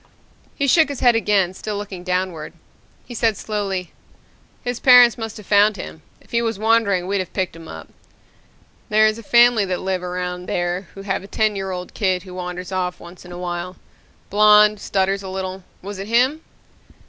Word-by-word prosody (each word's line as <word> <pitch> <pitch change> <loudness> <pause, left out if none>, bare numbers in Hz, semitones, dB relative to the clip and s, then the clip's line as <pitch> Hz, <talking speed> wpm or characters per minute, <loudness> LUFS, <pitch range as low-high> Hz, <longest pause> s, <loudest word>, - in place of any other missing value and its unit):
He 280 - 0
shook 310 +2 +4
his 285 - -6
head 245 -2 +5
again, 200 -5 +1
still 210 +2 -5
looking 195 -3 -7
downward. 180 -4 -3 0.5
He 245 - -9
said 225 -3 +1
slowly, 195 -4 -3 0.7
"His 245 -1 -3
parents 245 -2 +7
must 225 -1 -6
have 210 - -11
found 205 +1 +4
him. 160 - -8 0.2
If - - -25
he 235 - +1
was 225 -3 -2
wandering 215 -4 +2
we'd 200 +1 -1
have 185 -1 -5
picked 185 -3 -2
him 165 -1 -11
up. - - -9 1.0
There 215 +1 +4
is 215 +1 +1
a - - -8
family 235 0 +4
that 185 -2 -2
live 190 -1 -2
around 180 0 -4
there 175 +1 -2
who 195 - -9
have 195 -1 -2
a - - -10
ten 215 +1 0
year 195 -1 -4
old 180 -1 -6
kid 185 -4 0
who 185 -2 -11
wanders 180 0 -6
off 180 -1 -2
once 175 +1 -13
in 180 - -11
a 175 - -7
while. 175 0 -5 0.6
Blond, 210 0 +5
stutters 195 0 0
a 190 - -7
little. 190 0 -5 0.2
Was 200 0 -7
it 195 - -6
him?" 255 +7 +2
195 Hz, 195 wpm, -21 LUFS, 180-215 Hz, 1.0 s, parents